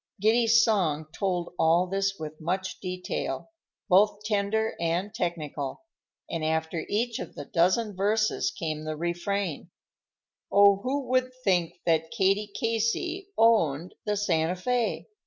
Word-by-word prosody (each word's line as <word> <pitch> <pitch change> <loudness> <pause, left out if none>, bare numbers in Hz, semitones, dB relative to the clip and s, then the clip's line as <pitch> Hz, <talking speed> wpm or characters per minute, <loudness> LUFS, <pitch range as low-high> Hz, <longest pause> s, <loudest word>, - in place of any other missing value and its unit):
Giddy's 225 +2 +4
song 170 -9 +1
told 180 -4 -2
all 165 +3 +4
this 195 +1 -1
with 155 0 -8
much 185 +4 -2
detail, 185 - -4 0.4
both 205 +2 +4
tender 215 +1 0
and 170 +5 -1
technical, 160 - -3 0.4
and 165 -2 -3
after 160 +1 -1
each 230 +2 0
of - - -7
the 145 - -7
dozen 185 +7 +1
verses 210 -7 +1
came 155 -2 -4
the 155 0 -3
refrain:— 175 +1 -2 0.8
"Oh, 200 0 +6
who 260 +6 -2
would 255 0 +2
think 180 -5 +1
that 160 -1 +2
Katie 200 +3 +1
Casey 230 - -1
owned 180 -8 +3
the 210 0 -1
Santa 175 -4 +1
Fé? 240 +4 -1
195 Hz, 130 wpm, -27 LUFS, 165-220 Hz, 0.8 s, Oh